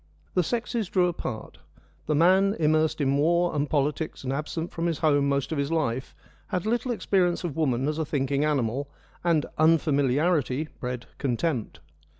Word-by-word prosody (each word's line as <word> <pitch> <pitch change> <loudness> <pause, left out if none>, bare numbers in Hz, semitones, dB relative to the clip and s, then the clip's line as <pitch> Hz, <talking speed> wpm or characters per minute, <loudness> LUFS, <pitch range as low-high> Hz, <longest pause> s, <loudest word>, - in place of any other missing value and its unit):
The 180 - +3
sexes 230 +1 -2
drew 180 -2 +3
apart: 125 -10 -5 0.5
the 155 - +1
man, 190 +5 +4
immersed 155 0 +2
in 140 0 +2
war 170 +3 +2
and 145 0 0
politics 150 +1 -1
and 130 0 -2
absent 155 +3 -3
from 170 +1 -2
his 165 -3 -1
home 145 -3 +2
most 140 +1 0
of 155 - -1
his 140 +2 -1
life, 130 -6 -1 0.3
had 180 0 -2
little 240 +3 0
experience 185 -7 +1
of 165 -6 -3
woman 135 -4 +1
as 155 +1 -1
a 160 - 0
thinking 140 0 0
animal, 140 -2 0 0.3
and 165 -4 +2
unfamiliarity 150 -1 +2
bred 125 -1 -4
contempt. 130 -1 -2
155 Hz, 160 wpm, -26 LUFS, 140-170 Hz, 0.5 s, man